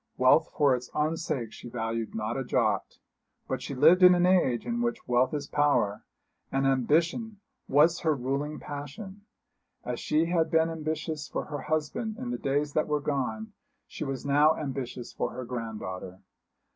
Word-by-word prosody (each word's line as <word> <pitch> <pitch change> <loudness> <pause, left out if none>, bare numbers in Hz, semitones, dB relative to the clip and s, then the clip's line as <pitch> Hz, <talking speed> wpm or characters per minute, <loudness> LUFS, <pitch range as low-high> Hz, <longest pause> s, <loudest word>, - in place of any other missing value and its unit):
Wealth 145 +6 +5
for 140 -3 +4
its 125 0 -7
own 155 +2 +1
sake 130 -9 -3
she 120 - -9
valued 115 -1 -3
not 110 +1 -2
a 135 - -2
jot. 125 - 0 0.5
But - - -3
she 140 - -5
lived 160 +8 +6
in 180 0 +9
an 175 0 +3
age 175 -10 +3
in 235 0 -2
which 235 -1 -2
wealth 125 +1 +3
is 145 -2 -3
power, 145 -9 +1 0.5
and 135 0 +1
ambition 165 - +1 0.3
was 155 +5 +4
her 160 -2 +1
ruling 140 +4 -3
passion. 190 - -8 0.6
As 125 -1 -3
she 155 +2 +1
had 165 -1 +1
been 160 0 +2
ambitious 155 -2 -4
for - - -4
her 145 -1 -5
husband 155 - -2
in 245 0 -4
the - - -3
days 145 +1 -1
that 155 - +1
were 150 -1 +1
gone, 150 - -3 0.3
she - - -7
was 135 -2 -4
now 145 +3 +4
ambitious 130 -4 -5
for - - -2
her 130 0 -6
granddaughter. 105 -6 -6
145 Hz, 170 wpm, -28 LUFS, 130-165 Hz, 0.6 s, in